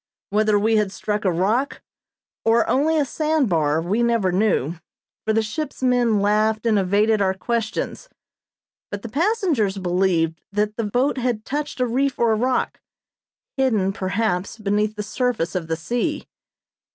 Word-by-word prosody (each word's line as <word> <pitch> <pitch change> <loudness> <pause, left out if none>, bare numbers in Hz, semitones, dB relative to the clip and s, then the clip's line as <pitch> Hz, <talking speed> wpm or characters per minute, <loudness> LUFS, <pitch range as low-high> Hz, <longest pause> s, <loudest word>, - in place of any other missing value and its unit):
Whether 215 0 +3
we 220 +2 +2
had 210 -2 +1
struck 210 +2 -3
a 185 - +3
rock, 210 +11 0 0.6
or 225 +1 +3
only 315 +4 +2
a 295 - +2
sand 305 -1 0
bar, 155 -3 +2
we 190 +8 0
never 230 -6 +2
knew, 180 - +1 0.5
for - - +3
the 220 0 +2
ship's 270 +5 -5
men 245 -4 +3
laughed 215 +2 +1
and 220 -3 +3
evaded 205 +3 +2
our 190 -1 +1
questions; 230 - -3 0.8
but 205 0 -6
the 235 - -6
passengers 310 - +1
believed 175 -3 0
that 210 +1 -1
the 230 - -2
boat 255 +6 0
had 240 -3 -1
touched 295 -1 -3
a 250 - +2
reef 265 +3 0
or 230 -2 +3
rock, 250 +4 -1 0.8
hidden, 215 -8 +1
perhaps, 195 0 -1
beneath 210 0 0
the 210 - -4
surface 235 -6 -1
of 180 -4 -3
the 160 0 -1
sea. 245 - -2
215 Hz, 155 wpm, -22 LUFS, 195-250 Hz, 0.8 s, Whether